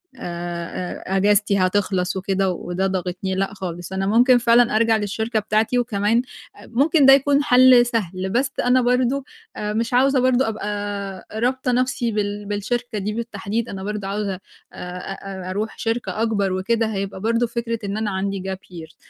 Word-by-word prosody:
آآ، 175 -3 -5
أجازتي 205 0 +3
هتخلَص 185 -1 0
وكده 190 0 0
وده 180 +2 -2
ضاغطني، 185 0 -3
لأ 195 +1 -1
خالص، 175 -2 -6
أنا 195 0 -1
ممكن 245 +4 +5
فعلًا 235 -1 +4
أرجَع 225 0 +3
للشركة 220 +2 -1
بتاعتي 215 +4 +1
وكمان 225 -1 +1 0.4
ممكن 280 +6 +2
ده 270 - +9
يكون 280 +1 +3
حَل 250 -2 +6
سهل، 190 -5 -2
بس 255 +6 0
أنا 250 +1 +3
برضه 250 +2 +1 0.3
آآ 210 0 -3
مش 230 +2 -1
عاوزة 270 +2 +4
برضه 255 0 +3
أبقى 205 -3 -4
رابطة 250 +3 0
نفْسي 245 -1 0
بال 205 0 -2
بالشركة 215 +3 -3
دي 210 +1 -2
بالتحديد، 225 0 -3
أنا 190 -1 -6
برضه 205 -1 -4
عاوزة 200 0 -2 0.4
آآ 180 0 -7 0.2
أ 190 -2 -7
أرُوح 210 +3 -3
شركة 225 -3 -2
أكبَر 200 -4 +1
وكده، 225 +4 0
هيبقى 195 -1 -4
برضه 230 +2 +1
فكرة 230 0 -3
إن 200 +1 -3
أنا 215 -2 -1
عندي 195 0 -2
Gap - - -6 0.2
year. 165 -2 -10
210 Hz, 160 wpm, -22 LUFS, 195-240 Hz, 0.4 s, ده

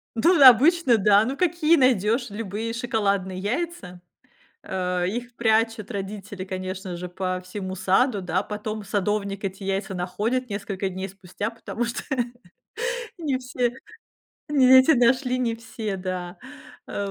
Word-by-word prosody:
Тут 330 +8 +4
обычно, 270 +1 +7
да. 205 0 +5
Ну, 265 +4 -3
какие 335 -2 +3
найдёшь- 240 - +2
любые 215 +2 -4
шоколадные 200 -6 -1
яйца. 210 - -4 0.6
А 180 -1 -2
их 240 +6 -4
прячут 225 -1 +1
родители, 200 -1 -6
конечно 185 -1 -5
же, 180 +1 -6
по 185 0 -3
всему 190 0 -5
саду, 195 +4 +2
да. 180 +1 -1
Потом 215 0 -5
садовник 200 0 -2
эти 195 +1 -4
яйца 195 0 -2
находит 215 +8 -2
несколько 200 -1 -3
дней 190 +1 -5
спустя, 195 +2 -5
потому 230 +1 -4
что 235 +2 -4 1.2
Не 285 -6 -1
все 250 -1 -1 0.8
не 280 -3 +4
эте 260 +5 +6
нашли, 255 +1 +2
не 235 -2 0
все, 220 -3 -5
да. 180 -1 -5 0.5
А 200 -1 -4
210 Hz, 135 wpm, -24 LUFS, 190-245 Hz, 1.2 s, обычно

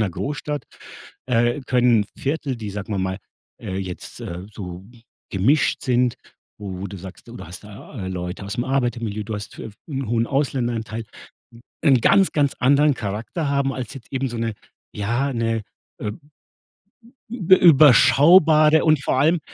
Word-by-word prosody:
'ner 105 -4 +1
Großstadt, 150 - -4 0.6
äh, 120 +2 +1
können 120 -4 +3
Viertel, 140 -2 -2
die, 105 -3 -6
sagen 105 +1 -6
wir 100 - -1
mal, 95 +1 -2 0.4
äh, 95 - -5
jetzt, 95 -2 -7
äh, 90 +3 -7
so 90 -2 -8 0.5
gemischt 125 +11 +2
sind, 125 -1 +1 0.4
wo 95 -3 -7
wo 100 - -4
du 100 +1 -8
sagst, 95 +5 -11
du 120 - -10
da - - -9
hast 90 +4 -10
da 105 0 -9
Leute 90 +1 -5
aus 100 - -5
'm 120 - 0
Arbeitermilieu, 120 -6 -2
du 110 0 -5
hast 105 -1 -8
f 110 -2 -8
hm, 140 -4 -4
'nen 135 - -4
hohen 115 0 +1
Ausländeranteil, 120 -5 -2 0.8
'nen 130 -5 +5
ganz, 195 -1 +4
ganz 145 -2 +2
anderen 140 +3 +4
Charakter 115 - -4
haben 140 -1 +1
als 130 +1 -6
jetzt 135 -4 -12
eben 135 0 -1
so 120 - -6
'ne, 115 -1 -2 0.4
ja 120 +7 -1
'ne, 115 -1 -1 0.4
ähm, 105 +9 -4 1.1
ü - - -5
übe 190 -5 +5
überschaubare 155 +1 +6
und 155 -3 +3
vor 130 - +1
allem 160 +3 +3
120 Hz, 165 wpm, -22 LUFS, 105-140 Hz, 1.1 s, überschaubare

